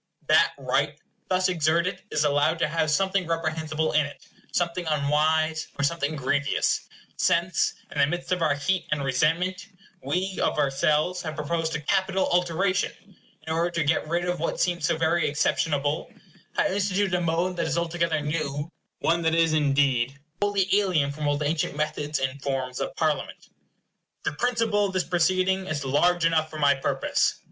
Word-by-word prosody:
That -, -, +4 dB
right -, -, -1 dB, 0.3 s
thus 185 Hz, 0 st, +2 dB
exerted 170 Hz, +2 st, +1 dB
is -, -, +1 dB
allowed 145 Hz, +3 st, +2 dB
to -, -, +1 dB
have 155 Hz, 0 st, 0 dB
something 190 Hz, +3 st, +1 dB
reprehensible 160 Hz, -1 st, -1 dB
in 150 Hz, -, +3 dB
it, 145 Hz, -, -14 dB, 0.3 s
something 175 Hz, 0 st, -1 dB
unwise, 155 Hz, +2 st, +1 dB
or 140 Hz, -, -1 dB
something 155 Hz, 0 st, 0 dB
grievous; 145 Hz, +1 st, 0 dB, 0.3 s
since, 170 Hz, +1 st, +1 dB, 0.2 s
in 145 Hz, -, -4 dB
the 140 Hz, -, +5 dB
midst 175 Hz, +4 st, -4 dB
of 180 Hz, -1 st, +1 dB
our 155 Hz, -3 st, +2 dB
heat 185 Hz, +6 st, -1 dB
and 150 Hz, -2 st, 0 dB
resentment, 165 Hz, -, 0 dB, 0.3 s
we, 185 Hz, +2 st, -2 dB
of -, -, +1 dB
ourselves, 150 Hz, +5 st, +1 dB
have 155 Hz, -2 st, -5 dB
proposed 160 Hz, +2 st, -2 dB
a 150 Hz, -, -3 dB
capital 190 Hz, +4 st, +1 dB
alteration; 180 Hz, +2 st, +1 dB
and 200 Hz, -3 st, -23 dB, 0.3 s
in 160 Hz, -, -2 dB
order 170 Hz, +2 st, +1 dB
to 170 Hz, -2 st, -1 dB
get 155 Hz, +1 st, +1 dB
rid 170 Hz, +2 st, 0 dB
of 180 Hz, -1 st, -2 dB
what 165 Hz, -, -2 dB
seemed 175 Hz, -1 st, 0 dB
so 170 Hz, -2 st, +1 dB
very 160 Hz, -1 st, +2 dB
exceptionable, 145 Hz, 0 st, 0 dB, 0.4 s
have -, -, +2 dB
instituted 195 Hz, 0 st, 0 dB
a 180 Hz, -, +1 dB
mode 170 Hz, +2 st, 0 dB
that 170 Hz, -1 st, 0 dB
is 160 Hz, -, -1 dB
altogether 170 Hz, -2 st, 0 dB
new; 150 Hz, 0 st, -3 dB, 0.3 s
one 170 Hz, +1 st, +2 dB
that 160 Hz, 0 st, +1 dB
is, 165 Hz, -1 st, +3 dB
indeed, 140 Hz, -3 st, +2 dB, 0.2 s
wholly 200 Hz, -2 st, +1 dB
alien 165 Hz, -8 st, +1 dB
from 150 Hz, +1 st, -3 dB
all 145 Hz, 0 st, +1 dB
the 150 Hz, -, -2 dB
ancient 150 Hz, -1 st, -1 dB
methods 150 Hz, 0 st, -2 dB
and 135 Hz, +1 st, -3 dB
forms 130 Hz, -2 st, -3 dB
of -, -, -3 dB
Parliament. -, -, -2 dB, 0.7 s
The -, -, -1 dB
principle 225 Hz, 0 st, +1 dB
of 190 Hz, -, -7 dB
this 185 Hz, -1 st, +1 dB
proceeding 185 Hz, +2 st, +1 dB
is 145 Hz, -3 st, -3 dB
large 170 Hz, +5 st, +2 dB
enough 160 Hz, -1 st, +2 dB
for 155 Hz, -, -8 dB
my 145 Hz, -2 st, +4 dB
purpose. 135 Hz, -, 0 dB
160 Hz, 175 wpm, -26 LUFS, 150-180 Hz, 0.7 s, the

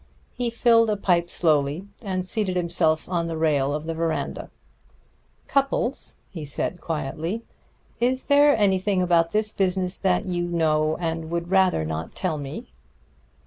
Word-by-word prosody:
He 245 Hz, -1 st, -2 dB
filled 230 Hz, -1 st, +4 dB
a 210 Hz, -, 0 dB
pipe 175 Hz, -3 st, +1 dB
slowly, 155 Hz, +1 st, +2 dB, 0.2 s
and 185 Hz, -3 st, -2 dB
seated 190 Hz, -2 st, -1 dB
himself 170 Hz, -3 st, +1 dB
on 170 Hz, -2 st, -1 dB
the 165 Hz, -1 st, -4 dB
rail 145 Hz, -4 st, +1 dB
of 150 Hz, +1 st, -3 dB
the 165 Hz, -, -3 dB
veranda. 165 Hz, 0 st, -3 dB, 1.0 s
"Cupples," 275 Hz, -2 st, 0 dB, 0.2 s
he 165 Hz, -5 st, -7 dB
said 150 Hz, +4 st, -3 dB
quietly, 165 Hz, +7 st, -3 dB, 0.6 s
"is 255 Hz, +2 st, +1 dB
there 285 Hz, -1 st, +5 dB
anything 190 Hz, -2 st, +2 dB
about 170 Hz, -2 st, +2 dB
this 215 Hz, 0 st, 0 dB
business 185 Hz, -1 st, +1 dB
that 185 Hz, -2 st, +1 dB
you 175 Hz, -2 st, -1 dB
know 155 Hz, -2 st, +1 dB
and 165 Hz, -2 st, -3 dB
would 170 Hz, +1 st, -3 dB
rather 190 Hz, -, +3 dB
not 80 Hz, +1 st, -5 dB
tell 160 Hz, -5 st, -2 dB
me?" 140 Hz, -, -7 dB
175 Hz, 145 wpm, -24 LUFS, 160-195 Hz, 1.0 s, there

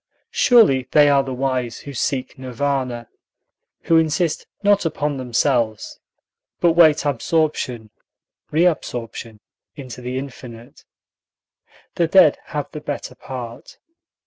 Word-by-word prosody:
Surely 170 Hz, -, +4 dB
they 145 Hz, -1 st, +6 dB
are 140 Hz, -1 st, +4 dB
the 135 Hz, -1 st, -6 dB
wise 125 Hz, -2 st, -2 dB
who 140 Hz, -, -9 dB
seek 130 Hz, +1 st, -2 dB
Nirvana; 130 Hz, -2 st, -3 dB, 0.8 s
who 165 Hz, -, +3 dB
insist 160 Hz, +1 st, 0 dB, 0.2 s
not 205 Hz, 0 st, +3 dB
upon 150 Hz, -3 st, -2 dB
themselves, 120 Hz, -3 st, -1 dB, 0.6 s
but 170 Hz, -, +4 dB
wait 160 Hz, -2 st, +4 dB
absorption 140 Hz, -5 st, -1 dB, 0.6 s
reabsorption 125 Hz, -9 st, -1 dB, 0.4 s
into 130 Hz, -4 st, -9 dB
the 125 Hz, +1 st, -4 dB
infinite. 125 Hz, -3 st, -10 dB, 1.1 s
The -, -, +2 dB
dead -, -, +5 dB
have -, -, -5 dB
the -, -, -7 dB
better -, -, -5 dB
part. 120 Hz, -3 st, -9 dB
135 Hz, 110 wpm, -20 LUFS, 125-155 Hz, 1.1 s, they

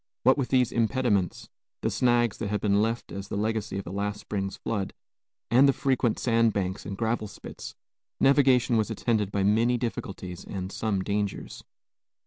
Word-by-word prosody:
What 130 Hz, +2 st, +6 dB
with 135 Hz, -3 st, -2 dB
these 125 Hz, -3 st, +3 dB
impediments, 115 Hz, -5 st, 0 dB, 0.3 s
the -, -, 0 dB
snags 120 Hz, -3 st, +2 dB
that 110 Hz, -, -2 dB
had 105 Hz, +1 st, -1 dB
been 100 Hz, -1 st, +2 dB
left 115 Hz, +2 st, -2 dB
as 100 Hz, 0 st, -6 dB
the 100 Hz, -, -4 dB
legacy 110 Hz, -1 st, -1 dB
of 100 Hz, -, -5 dB
last 100 Hz, +3 st, -3 dB
spring's 95 Hz, -1 st, -4 dB
flood, 105 Hz, -4 st, -3 dB, 0.6 s
and 130 Hz, +4 st, +6 dB
the -, -, +4 dB
frequent 130 Hz, -5 st, +1 dB
sand 115 Hz, -2 st, +2 dB
banks 95 Hz, -1 st, -2 dB
and 100 Hz, -, -5 dB
gravel 110 Hz, -1 st, -1 dB
spits, -, -, -9 dB, 0.4 s
navigation 130 Hz, -3 st, +4 dB
was 110 Hz, 0 st, +1 dB
attended 110 Hz, -2 st, 0 dB
by 100 Hz, -1 st, 0 dB
many 115 Hz, +5 st, +3 dB
difficulties 95 Hz, -6 st, -5 dB
and 95 Hz, -1 st, -5 dB
some 100 Hz, -4 st, -1 dB
dangers. 100 Hz, 0 st, -3 dB
110 Hz, 165 wpm, -27 LUFS, 100-120 Hz, 0.6 s, What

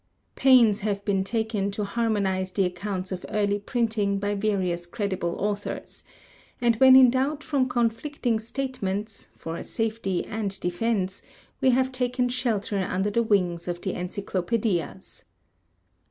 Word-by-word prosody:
Pains 240 Hz, -6 st, +5 dB
have 200 Hz, -1 st, -2 dB
been 195 Hz, -2 st, +1 dB
taken 220 Hz, -1 st, -1 dB
to 200 Hz, +1 st, -3 dB
harmonize 200 Hz, -3 st, 0 dB
the 195 Hz, 0 st, +1 dB
accounts 185 Hz, +1 st, -4 dB
of 185 Hz, -1 st, -4 dB
early 205 Hz, -1 st, +1 dB
printing 215 Hz, -2 st, 0 dB
by 205 Hz, +1 st, -1 dB
various 190 Hz, -4 st, -1 dB
credible 190 Hz, -3 st, -2 dB
authors, 205 Hz, 0 st, -4 dB, 0.6 s
and 235 Hz, -1 st, +3 dB
when 260 Hz, +1 st, +8 dB
in 260 Hz, -2 st, +8 dB
doubt 280 Hz, +4 st, 0 dB
from 275 Hz, -4 st, +1 dB
conflicting 240 Hz, +1 st, 0 dB
statements, 220 Hz, -4 st, -4 dB
for 165 Hz, +1 st, -5 dB
safety 220 Hz, -4 st, -2 dB
and 205 Hz, -3 st, -3 dB
defense, 190 Hz, +1 st, -1 dB, 0.4 s
we 265 Hz, -, +4 dB
have 260 Hz, +1 st, +2 dB
taken 250 Hz, -1 st, 0 dB
shelter 220 Hz, -5 st, -1 dB
under 190 Hz, +2 st, -1 dB
the 235 Hz, -, +2 dB
wings 180 Hz, -6 st, +1 dB
of 175 Hz, -1 st, -3 dB
the 190 Hz, -, -2 dB
encyclopædias. 185 Hz, +1 st, -2 dB
205 Hz, 135 wpm, -26 LUFS, 190-235 Hz, 0.6 s, when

